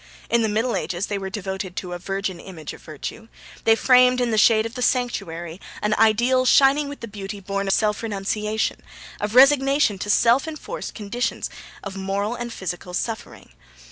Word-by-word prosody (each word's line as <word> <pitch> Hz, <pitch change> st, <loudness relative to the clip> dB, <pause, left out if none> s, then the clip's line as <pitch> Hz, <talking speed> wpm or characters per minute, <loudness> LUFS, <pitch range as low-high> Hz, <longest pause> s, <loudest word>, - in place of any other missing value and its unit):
In 235 Hz, -, +4 dB
the 220 Hz, -, +1 dB
Middle 225 Hz, +3 st, 0 dB
Ages 180 Hz, +2 st, -2 dB
they 205 Hz, -1 st, -3 dB
were 195 Hz, 0 st, -5 dB
devoted 190 Hz, -2 st, -5 dB
to 180 Hz, -1 st, -5 dB
a 175 Hz, -, -5 dB
virgin 195 Hz, -1 st, -3 dB
image 165 Hz, -5 st, -8 dB
of -, -, -13 dB
Virtue; 160 Hz, +8 st, -8 dB, 0.4 s
they 225 Hz, -, +6 dB
framed, 250 Hz, +1 st, +5 dB
in 245 Hz, -2 st, +1 dB
the -, -, +1 dB
shade 220 Hz, 0 st, +5 dB
of 230 Hz, -, -5 dB
the 250 Hz, -, -6 dB
sanctuary, 175 Hz, -, -1 dB, 0.2 s
an 210 Hz, 0 st, 0 dB
ideal 240 Hz, +4 st, +3 dB
shining 280 Hz, +3 st, +4 dB
with 285 Hz, -, -9 dB
the 230 Hz, -, -5 dB
beauty 200 Hz, -1 st, -7 dB
born 200 Hz, +1 st, -3 dB
of 195 Hz, -, +3 dB
self 210 Hz, -1 st, +1 dB
renunciation, 210 Hz, 0 st, -2 dB, 0.4 s
of 210 Hz, +2 st, -3 dB
resignation 275 Hz, -4 st, +5 dB
to 205 Hz, -, -4 dB
self 235 Hz, +7 st, +4 dB
enforced 320 Hz, +10 st, -6 dB
conditions 230 Hz, +3 st, -3 dB, 0.3 s
of 195 Hz, -, -6 dB
moral 200 Hz, +3 st, -2 dB
and 240 Hz, -1 st, -5 dB
physical 180 Hz, -3 st, -5 dB
suffering. 225 Hz, +3 st, -5 dB
215 Hz, 180 wpm, -23 LUFS, 195-245 Hz, 0.4 s, they